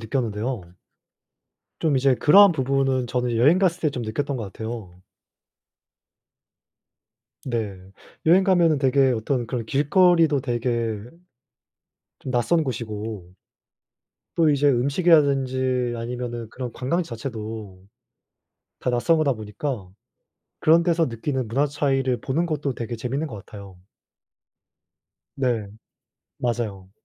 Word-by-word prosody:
느꼈는데요. 115 -1 -2 1.2
좀 150 -4 +2
이제 135 0 +3
그런 195 +9 +7
부분은 135 -2 0
저는 125 -1 -1
여행 145 +10 +5
갔을 180 -2 +1
때 155 - +1
좀 125 -3 -5
느꼈던 130 +5 -2
것 115 - -4
같아요. 105 -3 -7 2.5
네. 115 -6 -3 0.5
여행 180 +4 +6
가면은 170 -6 +3
되게 135 -1 +3
어떤 120 +1 -1
그런 120 -3 -3
길거리도 160 - +3
되게 120 -3 -1 1.2
좀 130 - -6
낯선 155 +7 +2
곳이고 110 -7 -5 1.0
또 160 -2 +4
이제 145 0 +3
음식이라든지 130 -3 +2
아니면은 120 -1 -5
그런 125 0 -6
관광지 165 +7 -1
자체도 110 -5 -7 1.0
다 - - -1
낯선 125 +7 +2
거다 145 -4 +2
보니까 110 0 -5 0.7
그런 165 +2 +5
데서 170 -2 +2
느끼는 130 +1 -3
문화 135 +7 +1
차이를 135 -4 0
보는 155 +6 0
것도 150 -5 -2
되게 120 0 -4
재밌는 130 +6 -3
것 130 -8 -7
같아요. 100 -3 -12 1.6
네. 120 -6 -1 0.7
맞아요. 110 -6 -3
130 Hz, 245 characters per minute, -23 LUFS, 115-145 Hz, 2.5 s, 그런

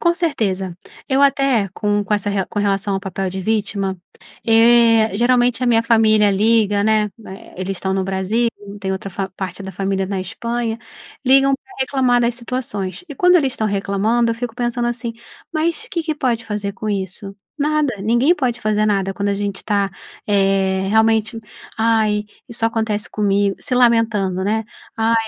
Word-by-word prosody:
Com 340 -1 +3
certeza, 215 - -1 0.4
eu 270 +1 +3
até 275 -7 +3
com 205 0 0
com 210 - -3
essa 205 0 +1
re 200 -1 0
com 205 - -5
relação 200 0 0
ao 195 - -2
papel 195 -1 -3
de 190 +1 -5
vítima, 200 -2 -1 0.5
eh, 225 -1 +5
geralmente 245 +1 +2
a - - +1
minha 230 -1 +4
família 215 -3 +4
liga, 205 0 +2
né, 215 -1 +2 0.2
eh, 190 - -11
eles 190 +1 -3
estão 190 0 -1
no 190 -1 0
Brasil, 195 +5 0 0.3
tem 190 0 -2
outra 190 +1 -5
fa 190 +1 -4
parte 190 0 -5
da 190 - -7
família 195 +1 -1
na 195 -1 -3
Espanha, 230 +4 -3 0.5
ligam 270 +1 +5
pra 390 - -12
reclamar 255 -2 +2
das 235 0 +1
situações 235 - -4
e, 290 - -7
quando 360 +4 +5
eles 270 -6 +1
estão 220 - -1
reclamando, 210 +4 +1
eu - - -1
fico 235 -1 -5
pensando 240 0 -1
assim: 240 0 -3 0.4
"Mas 335 +8 -1
que 335 -2 -2
que 310 -1 -2
pode 240 -5 -1
fazer 210 -2 -3
com 215 +2 -6
isso?" 195 0 -4 0.2
Nada! 300 -3 +1
Ninguém 240 - +3
pode 250 -6 -2
fazer 215 -1 +1
nada 195 -2 0
quando 200 +1 -2
a 200 - +1
gente 200 -1 -4
tá, 200 -2 +1 0.4
eh, 195 -1 +1
realmente: 220 +1 +2 0.4
"Ai, 220 -2 +2 0.3
só 230 -1 0
acontece 220 -2 -2
comigo", 200 -1 +1
se 250 - -2
lamentando, 225 -6 +2
né, 220 +2 0 0.3
"Ai, 225 +1 +2
220 Hz, 175 wpm, -19 LUFS, 195-240 Hz, 0.5 s, eh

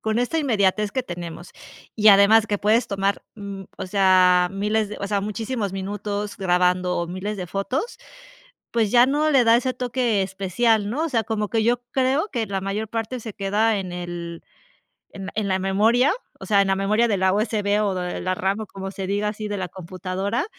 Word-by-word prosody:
con 220 +1 -1
esta 245 +7 0
inmediatez 210 -7 +1
que 260 - -2
tenemos, 175 -4 -8 0.4
y 215 -1 +5
además 205 +2 +6
que 205 -1 0
puedes 220 +4 +2
tomar, 200 0 -1
mm, 200 -2 -7
o - - -5
sea, 185 -2 +4
miles 210 +2 0
de, 210 - -7
o 200 - -2
sea, 200 -1 0
muchísimos 215 0 -3
minutos 205 +1 -4
grabando 180 -1 +1
o 170 - -2
miles 190 +4 -4
de 180 - -5
fotos, 225 - -3 0.7
pues, 225 -3 +1
ya 245 +2 +6
no 300 +3 +1
le 265 -4 +4
da 230 0 +6
ese 255 +1 0
toque 245 -4 0
especial, 200 +3 0
¿no? 300 +8 -1
O - - -1
sea, 230 -7 0
como 210 -2 -2
que 225 -1 0
yo 240 +1 +1
creo 265 +8 +1
que 230 -3 -2
la 195 -1 -3
mayor 200 +3 -3
parte 225 +3 -3
se 220 -1 -7
queda 210 +2 +1
en 185 -2 -5
el 175 -1 -6 0.7
en 195 -1 -7
en 215 -2 -1
la 190 - +1
memoria, 220 +8 +3 0.3
o - - -8
sea, 200 -2 +4
en 195 - +1
la 195 - +3
memoria 210 +4 +2
de 205 -4 +1
la 190 0 +2
USB 210 -1 +1
o 195 -2 -1
de 180 -1 -3
la 185 0 -1
RAM 195 +4 -1
o 215 - -6
como 195 0 -7
se 195 -1 -5
diga 205 +2 0
así 215 0 -5
de 205 -1 -3
la 185 -2 -4
computadora, 185 - -3
205 Hz, 205 wpm, -23 LUFS, 190-225 Hz, 0.7 s, además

